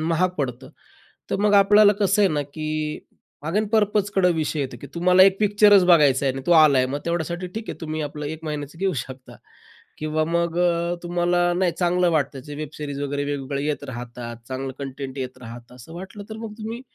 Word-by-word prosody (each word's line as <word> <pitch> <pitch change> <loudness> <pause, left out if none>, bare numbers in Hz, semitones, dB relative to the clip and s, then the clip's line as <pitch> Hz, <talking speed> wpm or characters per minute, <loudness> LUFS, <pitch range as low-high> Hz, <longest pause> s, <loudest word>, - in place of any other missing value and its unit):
महाग 175 +2 +2
पडतं. 130 -1 -4 0.6
तर - - +1
मग 205 - +3
आपल्याला 205 +1 +6
कसं 205 +1 +3
आहे 195 - +5
ना, 150 -3 -1
की 150 +2 -7 0.8
अगेन 210 +6 0
पर्पजकडं 205 -4 +2
विषय 155 -1 -1
येतो, 130 -3 -4
की 140 - -8
तुम्हाला 180 +2 +5
एक 195 0 +5
पिक्चरच 205 -2 +5
बघायचा 145 -6 +4
आहे 135 - +2
आणि 135 +1 -6
तो 175 - +4
आला 155 -5 +6
आहे, 130 - +3
मग 140 +3 -3
तेवढ्यासाठी 170 +1 -2
ठीक 220 0 -5
आहे, - - -9
तुम्ही 155 -1 -4
आपलं 150 0 -5
1 160 +2 -7
महिन्याचं 150 0 -5
घेऊ 190 0 0
शकता. 130 -1 -12 0.6
किंवा 155 +1 -1
मग 170 0 -1
अ, 170 -1 +1
तुम्हाला 175 0 +1
नाही 180 -1 +1
चांगलं 180 0 +2
वाटतं 140 -3 -1
जे 145 - -8
वेब 155 0 -5
सीरीज 145 -2 -5
वगैरे 145 0 -2
वेगवेगळ्या 140 0 -3
येत 150 -1 -2
राहतात, 120 -2 -7
चांगलं 130 0 -4
कंटेंट 135 0 -6
येत 130 -1 -5
राहतं 120 +1 -11
असं 125 +7 -12
वाटलं, 190 +3 -9
तर 220 - -6
मग 225 -1 -7
तुम्ही 225 +2 -5
160 Hz, 200 wpm, -23 LUFS, 140-185 Hz, 0.8 s, आपल्याला